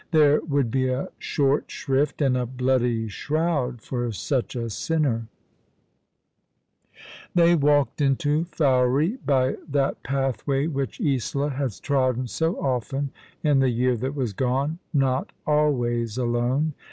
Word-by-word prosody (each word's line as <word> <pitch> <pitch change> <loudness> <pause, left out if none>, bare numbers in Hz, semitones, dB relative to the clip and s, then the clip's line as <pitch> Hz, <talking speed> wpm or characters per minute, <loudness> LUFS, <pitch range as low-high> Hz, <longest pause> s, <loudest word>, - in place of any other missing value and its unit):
There 150 -3 +4
would 140 -6 0
be 130 +1 +1
a 130 +1 -2
short 140 0 0
shrift 140 +2 0
and 130 -2 +3
a 125 -1 -1
bloody 125 -2 0
shroud 145 0 -1
for 120 -2 -2
such 125 +5 -2
a 115 -1 -2
sinner! 120 -1 0 2.1
They 170 0 +5
walked 145 -5 +2
into 145 +3 +1
Fowey 145 - +2
by 130 -2 +2
that 140 -1 0
pathway 135 +1 -1
which 140 - -3
Isola 140 - 0
had 135 -3 -2
trodden 130 -3 +1
so 160 +8 -1
often 135 +1 -2 0.3
in 145 -3 +4
the 135 -1 +3
year 125 +1 +1
that 130 +5 -3
w^as 125 -8 -2
gone— 135 - 0
not 135 -3 0
always 120 -7 +1
alone. 125 +5 0
135 Hz, 130 wpm, -24 LUFS, 125-145 Hz, 2.1 s, They